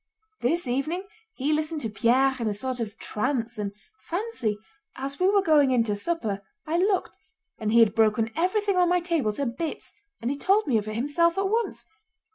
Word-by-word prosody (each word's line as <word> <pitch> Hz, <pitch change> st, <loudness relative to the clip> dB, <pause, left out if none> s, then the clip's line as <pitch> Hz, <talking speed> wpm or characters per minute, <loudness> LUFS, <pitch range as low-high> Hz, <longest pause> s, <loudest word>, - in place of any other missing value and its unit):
This 335 Hz, +7 st, +1 dB
evening 275 Hz, +9 st, -1 dB, 0.3 s
he 285 Hz, +3 st, 0 dB
listened 310 Hz, 0 st, -1 dB
to 225 Hz, -, -2 dB
Pierre 255 Hz, +5 st, +3 dB
in 230 Hz, -, -1 dB
a 210 Hz, -, -1 dB
sort 255 Hz, +4 st, -3 dB
of 215 Hz, -3 st, -4 dB
trance, 235 Hz, -1 st, -2 dB
and 200 Hz, -1 st, -2 dB, 0.3 s
fancy—as 280 Hz, -, -5 dB
we 365 Hz, -, +4 dB
were 400 Hz, 0 st, +4 dB
going 300 Hz, -6 st, +5 dB
in 250 Hz, -3 st, +3 dB
to 210 Hz, -2 st, -1 dB
supper 210 Hz, -5 st, -2 dB, 0.2 s
I 330 Hz, +2 st, 0 dB
looked 385 Hz, 0 st, +1 dB, 0.4 s
and 215 Hz, -2 st, -1 dB
he 230 Hz, +1 st, +6 dB
had 215 Hz, -3 st, +5 dB
broken 225 Hz, 0 st, +2 dB
everything 385 Hz, +4 st, +1 dB
on 355 Hz, -1 st, +4 dB
my 360 Hz, 0 st, +3 dB
table 335 Hz, -10 st, 0 dB
to 280 Hz, +6 st, -2 dB
bits, 270 Hz, +7 st, -4 dB, 0.3 s
and 235 Hz, +3 st, -2 dB
he 280 Hz, -, -3 dB
told 395 Hz, +8 st, +3 dB
me 240 Hz, -6 st, +2 dB
of 210 Hz, -, -7 dB
it 215 Hz, -, -4 dB
himself 315 Hz, +8 st, +2 dB
at 390 Hz, 0 st, +1 dB
once! 455 Hz, +2 st, -1 dB
275 Hz, 195 wpm, -26 LUFS, 225-345 Hz, 0.4 s, he